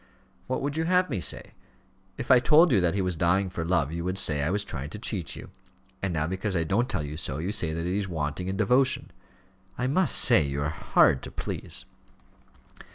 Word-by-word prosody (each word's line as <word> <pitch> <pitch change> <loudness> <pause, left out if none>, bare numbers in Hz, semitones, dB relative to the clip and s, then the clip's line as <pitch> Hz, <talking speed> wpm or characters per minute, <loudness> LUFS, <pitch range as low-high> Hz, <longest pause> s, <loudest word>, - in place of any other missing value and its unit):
"What 130 - -2
would 145 +2 -3
you 160 - 0
have 180 -1 +2
me 105 - -1
say? - - +1 0.7
If 120 - -2
I 130 - +8
told 155 +7 +5
you 100 -6 +4
that 90 +1 +1
he 100 - 0
was 90 -1 -1
dying 90 +3 +1
for 85 -3 -4
love, 80 -4 0
you 85 +1 -4
would 90 +2 -2
say, 75 -6 +3
I 70 - 0
was 100 +2 0
trying 70 -7 -6
to 95 - -7
cheat 100 -5 -3
you; - - -11 0.5
and 95 - -2
now 75 -2 -1
because 95 +3 -2
I 85 - +1
don't 110 +10 0
tell 75 - -2
you 75 +1 -6
so, 70 -4 +1
you 85 +6 -3
say 85 -6 +1
that 85 +1 -4
he 90 +3 -1
is 100 -2 -4
wanting 80 +2 -3
in 95 +1 -3
devotion. 130 +4 +1 0.7
I 125 - -2
must 155 +7 +1
say 115 -8 +6
you 70 -1 -2
are 75 - -1
hard 70 -3 +2
to - - -8
please." - - -5
95 Hz, 225 wpm, -26 LUFS, 80-120 Hz, 0.7 s, I